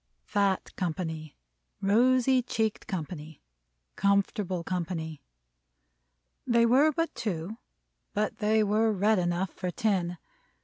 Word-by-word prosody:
Fat 200 Hz, -2 st, 0 dB
company, 160 Hz, -3 st, -4 dB, 0.4 s
rosy 255 Hz, +5 st, +4 dB
cheeked 220 Hz, -3 st, -2 dB
company, 160 Hz, -3 st, -5 dB, 0.6 s
comfortable 200 Hz, -2 st, +1 dB
company. 165 Hz, -4 st, -3 dB, 1.3 s
They 235 Hz, -1 st, +4 dB
were 270 Hz, +6 st, +5 dB
but 330 Hz, +3 st, -1 dB
two, 195 Hz, 0 st, -4 dB, 0.6 s
but 215 Hz, +1 st, -1 dB
they 215 Hz, +1 st, +3 dB
were 215 Hz, +2 st, +2 dB
red 210 Hz, +1 st, +2 dB
enough 175 Hz, +1 st, -1 dB
for 180 Hz, -, -4 dB
ten. 180 Hz, -2 st, 0 dB
200 Hz, 100 wpm, -28 LUFS, 175-220 Hz, 1.3 s, were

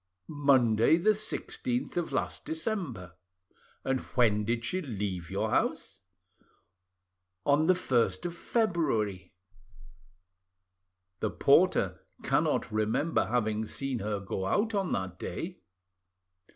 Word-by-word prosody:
"Monday, 125 Hz, 0 st, +5 dB
the 200 Hz, +6 st, +4 dB
16th 140 Hz, -, -2 dB
of 175 Hz, -2 st, -1 dB
last -, -, -2 dB
December." 160 Hz, -, -4 dB, 0.7 s
"And 130 Hz, -1 st, 0 dB
when 110 Hz, -5 st, +1 dB
did 115 Hz, +1 st, -1 dB
she 185 Hz, +10 st, -1 dB
leave 100 Hz, -, -4 dB
your -, -, -1 dB
house?" -, -, 0 dB, 1.5 s
"On 145 Hz, +2 st, +3 dB
the 185 Hz, -, +5 dB
1st 130 Hz, -2 st, +1 dB
of 175 Hz, -1 st, -3 dB
February." 115 Hz, -, -1 dB, 1.8 s
"The -, -, 0 dB
porter -, -, +3 dB, 0.2 s
cannot -, -, +1 dB
remember 110 Hz, +9 st, +1 dB
having 110 Hz, -2 st, 0 dB
seen 135 Hz, 0 st, -3 dB
her 105 Hz, 0 st, -2 dB
go 95 Hz, -1 st, -3 dB
out 220 Hz, -, +1 dB
on 195 Hz, -3 st, 0 dB
that 95 Hz, -1 st, -3 dB
day." -, -, -5 dB
125 Hz, 110 wpm, -30 LUFS, 105-165 Hz, 1.8 s, Monday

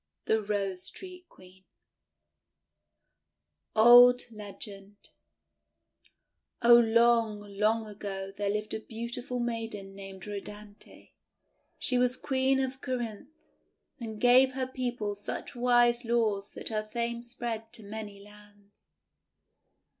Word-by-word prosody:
THE 220 Hz, 0 st, +2 dB
ROSE 195 Hz, -3 st, -2 dB
TREE 365 Hz, -1 st, -12 dB
QUEEN 185 Hz, +1 st, -18 dB, 2.1 s
Old 245 Hz, +2 st, +8 dB
Legend 205 Hz, -1 st, -9 dB, 1.7 s
OH, 240 Hz, 0 st, +8 dB
long, 230 Hz, -2 st, +4 dB
long 210 Hz, +2 st, 0 dB
ago 195 Hz, -2 st, -6 dB
there 205 Hz, 0 st, -2 dB
lived 210 Hz, +1 st, -3 dB
a 220 Hz, -, -2 dB
beautiful 240 Hz, +3 st, -5 dB
maiden 225 Hz, -4 st, -4 dB
named 195 Hz, -1 st, -10 dB
Rhodanthe. 205 Hz, 0 st, -10 dB, 0.7 s
She 250 Hz, -1 st, 0 dB
was 250 Hz, 0 st, +1 dB
Queen 265 Hz, -1 st, +1 dB
of 265 Hz, 0 st, -3 dB
Corinth, 255 Hz, +4 st, -5 dB, 0.5 s
and 220 Hz, -3 st, -7 dB
gave 255 Hz, +2 st, +5 dB
her 260 Hz, 0 st, -2 dB
people 245 Hz, -5 st, -3 dB
such 205 Hz, 0 st, -6 dB
wise 240 Hz, 0 st, +3 dB
laws 220 Hz, -4 st, 0 dB
that -, -, -6 dB
her 215 Hz, -1 st, -1 dB
fame 235 Hz, +2 st, -3 dB
spread 235 Hz, -2 st, -5 dB
to 225 Hz, -3 st, -5 dB
many 205 Hz, -1 st, -7 dB
lands. 205 Hz, 0 st, -20 dB
225 Hz, 110 wpm, -29 LUFS, 205-245 Hz, 2.1 s, Old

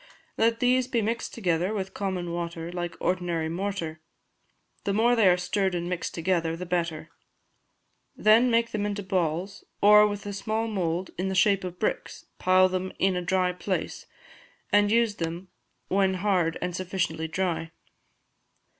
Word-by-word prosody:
Let 230 Hz, 0 st, +2 dB
these 250 Hz, 0 st, +3 dB
be 235 Hz, -3 st, 0 dB
mixed 230 Hz, +2 st, -2 dB
together 180 Hz, -1 st, 0 dB
with 190 Hz, -1 st, -4 dB
common 185 Hz, -3 st, -3 dB
water, 170 Hz, -1 st, -4 dB
like 175 Hz, -1 st, -4 dB
ordinary 175 Hz, -3 st, -1 dB
mortar; 170 Hz, -3 st, -4 dB, 0.8 s
the 200 Hz, -, -1 dB
more 235 Hz, +4 st, +3 dB
they 220 Hz, -4 st, +4 dB
are 180 Hz, -, +4 dB
stirred 185 Hz, +1 st, 0 dB
and 175 Hz, 0 st, -2 dB
mixed 180 Hz, -1 st, -3 dB
together 165 Hz, -1 st, 0 dB
the 180 Hz, +2 st, -6 dB
better; 170 Hz, -2 st, -2 dB, 1.0 s
then 225 Hz, +4 st, +5 dB
make 230 Hz, 0 st, +2 dB
them 205 Hz, -1 st, -1 dB
into 205 Hz, 0 st, -3 dB
balls, 185 Hz, 0 st, -2 dB, 0.2 s
or, 210 Hz, +1 st, +7 dB
with 205 Hz, -1 st, -5 dB
a 205 Hz, -, -4 dB
small 220 Hz, +3 st, -2 dB
mould, 180 Hz, -4 st, -2 dB
in 185 Hz, -, 0 dB
the 190 Hz, -, -2 dB
shape 200 Hz, 0 st, +3 dB
of 180 Hz, -1 st, -6 dB
bricks, 215 Hz, -, -3 dB
pile 185 Hz, 0 st, +5 dB
them 185 Hz, 0 st, -3 dB
in 190 Hz, -1 st, +2 dB
a 180 Hz, -, -1 dB
dry 180 Hz, 0 st, +1 dB
place, 180 Hz, +1 st, -4 dB, 0.6 s
and 205 Hz, 0 st, +4 dB
use 230 Hz, -2 st, +3 dB, 0.7 s
when 190 Hz, 0 st, +2 dB
hard 180 Hz, -4 st, +1 dB
and 180 Hz, -1 st, -3 dB
sufficiently 180 Hz, -3 st, -2 dB
dry. 165 Hz, -1 st, -2 dB
185 Hz, 155 wpm, -27 LUFS, 175-205 Hz, 1.0 s, or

